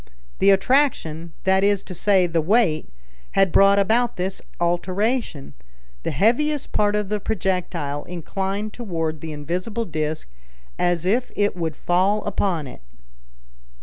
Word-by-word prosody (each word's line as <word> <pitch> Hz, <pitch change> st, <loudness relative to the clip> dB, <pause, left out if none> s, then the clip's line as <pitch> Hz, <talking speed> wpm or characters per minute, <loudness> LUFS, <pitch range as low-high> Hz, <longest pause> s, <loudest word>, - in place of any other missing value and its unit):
The 195 Hz, -, +5 dB
attraction, 190 Hz, -, +2 dB
that 190 Hz, 0 st, +3 dB
is 200 Hz, -1 st, +2 dB
to 185 Hz, -, -8 dB
say 190 Hz, 0 st, +3 dB
the 165 Hz, -1 st, 0 dB
weight, 180 Hz, -3 st, +2 dB, 0.4 s
had 195 Hz, -2 st, +3 dB
brought 195 Hz, +2 st, +6 dB
about 225 Hz, +4 st, +2 dB
this 185 Hz, +1 st, -3 dB, 0.2 s
alteration. 180 Hz, -, -1 dB, 0.5 s
The -, -, -3 dB
heaviest 255 Hz, -, +1 dB
part 205 Hz, 0 st, +2 dB
of 210 Hz, -2 st, -1 dB
the 210 Hz, 0 st, -1 dB
projectile 180 Hz, -8 st, -2 dB
inclined 195 Hz, +4 st, -4 dB
toward 165 Hz, -9 st, -3 dB
the 160 Hz, -, -6 dB
invisible 180 Hz, +10 st, -3 dB
disc 155 Hz, -, -3 dB, 0.5 s
as 175 Hz, -1 st, +1 dB
if 240 Hz, +7 st, +1 dB
it 205 Hz, -2 st, +1 dB
would 165 Hz, -3 st, -3 dB
fall 190 Hz, +6 st, +1 dB
upon 185 Hz, -6 st, -1 dB
it. 125 Hz, -, -11 dB
190 Hz, 135 wpm, -22 LUFS, 165-210 Hz, 0.5 s, brought